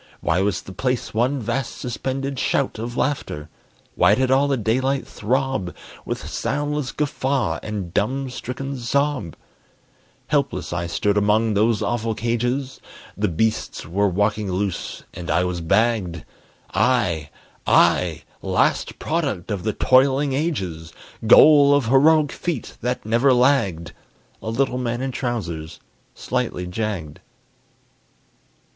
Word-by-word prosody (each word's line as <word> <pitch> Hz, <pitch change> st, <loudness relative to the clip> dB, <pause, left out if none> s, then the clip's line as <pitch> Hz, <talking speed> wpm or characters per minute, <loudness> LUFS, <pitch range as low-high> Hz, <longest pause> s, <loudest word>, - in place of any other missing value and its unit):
Why 85 Hz, +3 st, +1 dB
was 95 Hz, -2 st, 0 dB
the -, -, -10 dB
place 125 Hz, +5 st, -2 dB
one 125 Hz, +6 st, +1 dB
vast 120 Hz, +2 st, -3 dB
suspended 135 Hz, +2 st, -3 dB
shout 135 Hz, -5 st, 0 dB
Of 120 Hz, +2 st, -5 dB
laughter? 80 Hz, -, -2 dB, 0.4 s
Why 100 Hz, +4 st, +4 dB
did 130 Hz, +1 st, +1 dB
all 135 Hz, +2 st, +4 dB
the 140 Hz, -1 st, +1 dB
daylight 130 Hz, +5 st, 0 dB
throb 130 Hz, -4 st, -1 dB, 0.3 s
With -, -, -4 dB
soundless 145 Hz, -1 st, -2 dB
guffaw 140 Hz, -4 st, -1 dB
and 100 Hz, -5 st, -5 dB
dumb 130 Hz, +5 st, -1 dB
stricken 135 Hz, +2 st, -5 dB
sob? 130 Hz, -, -1 dB, 0.9 s
Helpless -, -, -1 dB
I 85 Hz, 0 st, -2 dB
stood 100 Hz, +4 st, 0 dB
among 105 Hz, +2 st, +2 dB
those 110 Hz, +1 st, +2 dB
awful 115 Hz, -2 st, -1 dB
cages; 125 Hz, +4 st, -2 dB, 0.3 s
The 105 Hz, +1 st, 0 dB
beasts 110 Hz, +6 st, -1 dB
were 100 Hz, +5 st, +1 dB
walking 105 Hz, +1 st, 0 dB
loose, 95 Hz, -1 st, -3 dB
and 85 Hz, 0 st, -7 dB
I 85 Hz, +3 st, +2 dB
was 90 Hz, -1 st, -2 dB
bagged! 100 Hz, -2 st, +1 dB, 0.5 s
I, 90 Hz, -, +1 dB, 0.4 s
I, -, -, +3 dB, 0.2 s
last -, -, +1 dB
product 140 Hz, -, -2 dB
of 100 Hz, -3 st, -2 dB
the 110 Hz, +3 st, -1 dB
toiling 135 Hz, +4 st, +3 dB
ages, 95 Hz, -, -2 dB, 0.4 s
Goal 145 Hz, +3 st, +8 dB
of 145 Hz, -4 st, +1 dB
heroic 150 Hz, +3 st, +5 dB
feet 165 Hz, -9 st, -4 dB
that 125 Hz, -1 st, -2 dB
never 120 Hz, +5 st, +3 dB
lagged 115 Hz, -, +2 dB, 0.5 s
A -, -, -4 dB
little 125 Hz, +2 st, 0 dB
man 120 Hz, 0 st, -2 dB
in 135 Hz, 0 st, -2 dB
trousers, 90 Hz, -, -4 dB, 0.4 s
slightly 90 Hz, -, -2 dB
jagged. 90 Hz, -5 st, -4 dB
115 Hz, 125 wpm, -22 LUFS, 100-135 Hz, 0.9 s, Goal